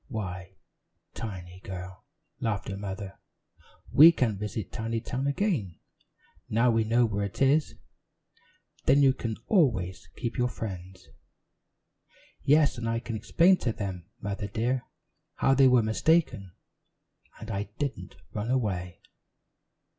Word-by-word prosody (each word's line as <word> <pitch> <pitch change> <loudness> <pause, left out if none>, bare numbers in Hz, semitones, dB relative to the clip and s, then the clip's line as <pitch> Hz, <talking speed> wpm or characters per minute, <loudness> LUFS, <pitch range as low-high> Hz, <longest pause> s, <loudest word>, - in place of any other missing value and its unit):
"Why, 95 - -6 0.6
Tiny, 90 -5 -7
girl," 95 -1 -8 0.4
laughed 105 -3 -2
her 95 - -4
mother, 100 0 -6 0.7
"we 160 +4 +9
can 125 -9 0
visit 105 0 -5
Tinytown 115 +4 -3
again, 140 - -1 0.7
now 115 +3 +3
we 115 -1 +2
know 120 +2 +3
where 105 -2 -1
it 100 - -7
is 140 +3 +3 1.1
then 140 +1 +5
you 135 -1 +6
can 115 -4 -4
always 115 - +1
keep 120 +2 -4
your 125 0 +2
friends." 95 -5 -7 1.3
"Yes, 145 -3 +3
and 115 -1 -2
I 115 0 0
can 115 -1 -5
explain 170 - +4
to 120 - -1
them, 95 -5 -5
Mother 100 0 -4
dear, 120 +5 -1 0.5
how 135 - +3
they 135 0 +6
were 125 -2 +5
mistaken, 110 - +1 0.9
and 110 0 -7
I 100 0 -3
didn't 130 -10 -4 0.2
run 105 +2 -3
away." 95 -9 -1
110 Hz, 125 wpm, -28 LUFS, 95-130 Hz, 1.3 s, we